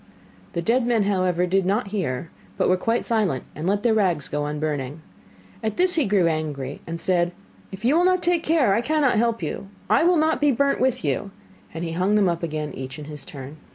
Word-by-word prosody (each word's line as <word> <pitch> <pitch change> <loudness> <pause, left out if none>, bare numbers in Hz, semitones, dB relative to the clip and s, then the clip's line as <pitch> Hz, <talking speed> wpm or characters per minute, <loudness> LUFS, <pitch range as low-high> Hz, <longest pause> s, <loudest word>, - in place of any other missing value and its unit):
The 170 - -2
dead 240 +6 +2
men, 230 -3 +3
however, 185 -3 +1
did 190 +2 +2
not 200 +3 0
hear, 165 -7 -3 0.3
but - - +2
were 185 - +4
quite 225 +6 0
silent, 205 - 0
and 155 +4 -4
let 200 +1 +1
their 235 -2 +3
rags 180 -9 +1
go 145 0 -2
on 150 0 -3
burning. 150 0 -3 0.6
At 220 -1 -2
this 365 0 +2
he 310 -5 +2
grew 195 -3 +3
angry, 150 -4 -2
and 165 0 -4
said: 175 -1 +1 0.4
'If 195 +3 -7
you 270 +5 +4
will 350 +2 +4
not 370 -1 +2
take 345 -1 +2
care, 310 -11 +3
I 230 - +2
cannot 290 -1 +2
help 230 -4 0
you, 160 +5 -4 0.2
I - - +5
will 350 +1 +4
not 315 0 +2
be 290 -1 +4
burnt 280 +2 +1
with 255 -8 +1
you,' 145 +8 -1 0.4
and 165 - -5
he 165 - -4
hung 185 +5 +1
them 205 -2 +4
up 170 -1 -2
again 155 -3 -3
each 130 +1 -7
in 150 - -8
his 150 -1 -7
turn. 140 +2 -9
190 Hz, 225 wpm, -23 LUFS, 155-235 Hz, 0.6 s, I